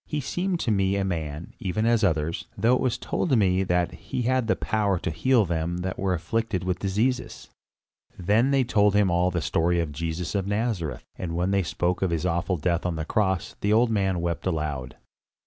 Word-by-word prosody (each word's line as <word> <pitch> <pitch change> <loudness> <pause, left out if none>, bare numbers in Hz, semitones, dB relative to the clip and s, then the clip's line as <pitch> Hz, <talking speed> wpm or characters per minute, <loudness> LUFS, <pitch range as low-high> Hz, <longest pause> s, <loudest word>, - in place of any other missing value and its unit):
He 150 - -2
seemed 175 +6 -2
to 115 - 0
me 95 -1 +2
a 100 - 0
man, 80 -3 -4
even 100 +3 -1
as 115 -1 +3
others, 80 -3 0
though 115 +5 +3
it 125 - +2
was 130 -3 0
told 140 -8 0
me 95 -3 +3
that 90 -1 +1
he 85 +8 -4
had 130 -1 +1
the - - +3
power 105 -3 0
to 90 - -3
heal 120 +6 +3
them 85 0 -2
that 95 +1 -4
were 95 -1 +1
afflicted 110 +2 -2
with 90 -1 -1
diseases." 110 +7 -1 0.7
Then 105 +8 +2
they 135 -1 +3
told 105 -4 +3
him 100 -3 +3
all 90 +1 +2
the 85 -2 -2
story 85 +1 +1
of 80 -3 -1
Jesus 80 +3 -3
of 100 -2 -1
Nazareth; 105 -6 -2
and 85 -3 -4
when 90 +3 0
they 100 0 +3
spoke 90 +1 -1
of 95 - +2
his 85 0 -1
awful 90 +1 0
death 85 +2 0
on 90 -2 -1
the 80 -1 -3
cross, 95 -2 0
the 100 - +1
old 115 +1 +4
man 95 -4 +1
wept 85 +1 -2
aloud. 75 -7 -3
95 Hz, 210 wpm, -25 LUFS, 85-110 Hz, 0.7 s, old